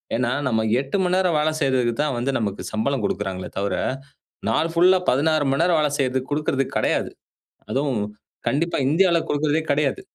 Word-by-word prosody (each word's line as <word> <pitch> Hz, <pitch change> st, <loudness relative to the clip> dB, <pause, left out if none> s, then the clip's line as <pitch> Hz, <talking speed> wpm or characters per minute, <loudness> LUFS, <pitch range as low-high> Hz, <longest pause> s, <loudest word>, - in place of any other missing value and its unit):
ஏன்னா, 120 Hz, 0 st, 0 dB, 0.2 s
நம்ம 110 Hz, -3 st, +1 dB, 0.2 s
8 140 Hz, +7 st, -2 dB
மணி 180 Hz, 0 st, +1 dB
நேரம் 180 Hz, -4 st, +2 dB
வேல 150 Hz, +1 st, +2 dB
செய்றதுக்கு 130 Hz, -4 st, +2 dB
தான் 150 Hz, -3 st, 0 dB
வந்து 125 Hz, +3 st, -1 dB
நமக்கு 105 Hz, -3 st, -3 dB
சம்பளம் 125 Hz, +3 st, -1 dB
குடுக்கறாங்களே 95 Hz, -2 st, -3 dB
தவிர, 100 Hz, +1 st, -1 dB, 0.7 s
நாள் 165 Hz, +1 st, +1 dB
ஃபுல்லா 180 Hz, +2 st, +5 dB
16 155 Hz, +3 st, +2 dB
மணி 135 Hz, -, +1 dB
நேரம் 175 Hz, -1 st, +3 dB
வேல 150 Hz, -1 st, +2 dB
செய்றதுக்கு 130 Hz, -1 st, -1 dB
குடுக்குறது 145 Hz, -2 st, 0 dB
கெடையாது. -, -, 0 dB, 0.6 s
அதுவும், 135 Hz, -5 st, 0 dB, 0.5 s
கண்டிப்பா 165 Hz, +5 st, 0 dB
இந்தியாவில 170 Hz, +1 st, +3 dB
குடுக்குறதே 150 Hz, +2 st, +1 dB
கெடையாது. 140 Hz, -1 st, 0 dB
140 Hz, 160 wpm, -22 LUFS, 125-160 Hz, 0.7 s, ஃபுல்லா